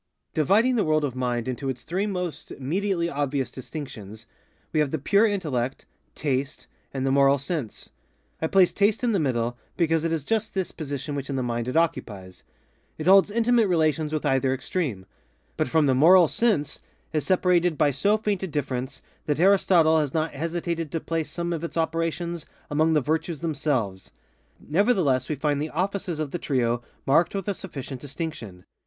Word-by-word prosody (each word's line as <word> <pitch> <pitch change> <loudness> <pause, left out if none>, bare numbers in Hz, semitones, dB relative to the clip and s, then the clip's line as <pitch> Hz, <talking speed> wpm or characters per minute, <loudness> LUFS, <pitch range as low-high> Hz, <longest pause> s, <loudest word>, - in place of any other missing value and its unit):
Dividing 215 - +3
the 215 - +3
world 155 -1 +2
of 130 -3 -4
mind 125 -2 -1
into 130 +2 -3
its 125 -2 -5
three 190 +5 -1
most 180 -5 -4
immediately 170 +5 -1
obvious 140 -3 -2
distinctions, 115 -6 -8 0.5
we 155 - +2
have 150 -2 +2
the 160 - -1
Pure 200 +10 +3
Intellect, 140 - -2 0.3
Taste, 140 0 -2 0.3
and 135 -1 -3
the 135 - +2
Moral 140 0 +5
Sense. 140 - -5 0.5
I 160 - +1
place 185 +1 +4
Taste 205 +3 +2
in 240 - +2
the 200 - +2
middle, 120 -4 -1 0.2
because 165 -2 +2
it 165 - 0
is 160 -3 -1
just 220 +4 -1
this 190 -2 -1
position 145 -2 -5
which 140 -1 -4
in 140 - -2
the 130 - -1
mind 120 -1 -2
it 125 - -1
occupies. 100 - -2 0.6
It 155 - -5
holds 195 +2 +6
intimate 230 +1 +3
relations 155 -3 +1
with 155 -1 -2
either 135 -1 +2
extreme; 130 - -3 0.5
but - - 0
from 155 +4 +3
the 135 - +3
Moral 170 +6 +7
Sense 195 -8 +1 0.3
is 155 - 0
separated 180 -3 +2
by 150 -2 +3
so 200 +11 +2
faint 210 -3 -1
a 190 - -2
difference 135 -3 -4 0.2
that 150 0 0
Aristotle 175 -4 +5
has 150 -2 -2
not 160 0 0
hesitated 165 +1 -3
to 165 - 0
place 160 -1 -3
some 170 +2 -3
of 165 -1 -4
its 170 - -5
operations 165 +1 -2 0.2
among 155 +2 +3
the 150 - +3
virtues 160 +3 -2
themselves. 135 - -2 0.5
Nevertheless 160 - +1
we 155 - 0
find 145 0 0
the 155 - -2
_offices 180 -1 -2
_of 150 -3 -3
the 175 - -3
trio 120 -5 0 0.2
marked 165 +7 +3
with 195 -1 -3
a 200 - +1
sufficient 140 -9 -7
distinction. 135 - -6
155 Hz, 180 wpm, -25 LUFS, 135-175 Hz, 0.6 s, Moral